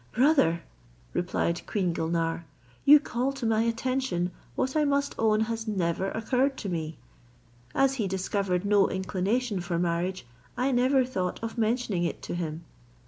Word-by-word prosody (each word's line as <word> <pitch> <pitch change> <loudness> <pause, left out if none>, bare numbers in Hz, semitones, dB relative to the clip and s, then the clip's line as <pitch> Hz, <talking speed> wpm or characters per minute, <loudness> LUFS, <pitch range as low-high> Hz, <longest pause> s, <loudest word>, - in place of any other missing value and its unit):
"Brother," 240 - +3 0.5
replied 175 -1 0
queen 185 -5 0
Gulnare, 165 0 -1 0.4
"you 295 +1 +9
call 260 -1 -2
to 270 -3 -5
my 220 -1 +3
attention 230 -5 0 0.2
what 260 - -1
I 305 - +3
must 280 -1 +1
own 220 -1 +3
has 225 0 -2
never 190 -2 0
occurred 255 +5 0
to 200 - -4
me. 160 -2 -3 0.8
As 270 0 +4
he 200 - 0
discovered 190 0 -1
no 200 -1 +4
inclination 195 +4 -1
for 175 -1 -2
marriage, 175 0 -1 0.3
I 260 +2 +1
never 255 +1 +3
thought 185 -8 -2
of 225 - -4
mentioning 225 -5 0
it 170 - -3
to - - -4
him. 165 -1 -4
205 Hz, 150 wpm, -28 LUFS, 175-250 Hz, 0.8 s, you